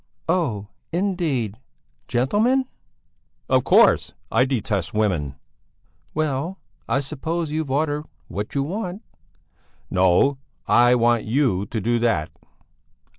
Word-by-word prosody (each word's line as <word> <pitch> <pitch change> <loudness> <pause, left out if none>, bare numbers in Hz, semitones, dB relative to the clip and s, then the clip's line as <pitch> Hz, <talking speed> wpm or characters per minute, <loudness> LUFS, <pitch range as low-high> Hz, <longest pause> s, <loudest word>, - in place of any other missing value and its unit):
"Oh, 125 - 0 0.2
indeed! 160 - -1 0.5
Gentlemen?" 215 - +2 0.8
"Of - - +3
course! - - +4 0.2
I 125 +3 +4
detest 110 -9 -2
women." 90 -11 0 0.8
"Well, 155 +4 -1 0.3
I 135 - +2
suppose 155 +3 -3
you've 155 -2 -2
ordered 145 +2 0 0.2
what 105 - -5
you 140 - +2
want?" 190 +5 -4 0.9
"No, 95 +10 +3 0.3
I 120 +1 +5
want 120 -1 +2
you 110 -6 +1
to 110 - -3
do 120 +3 +1
that." 110 -10 +1
130 Hz, 105 wpm, -23 LUFS, 110-160 Hz, 0.9 s, I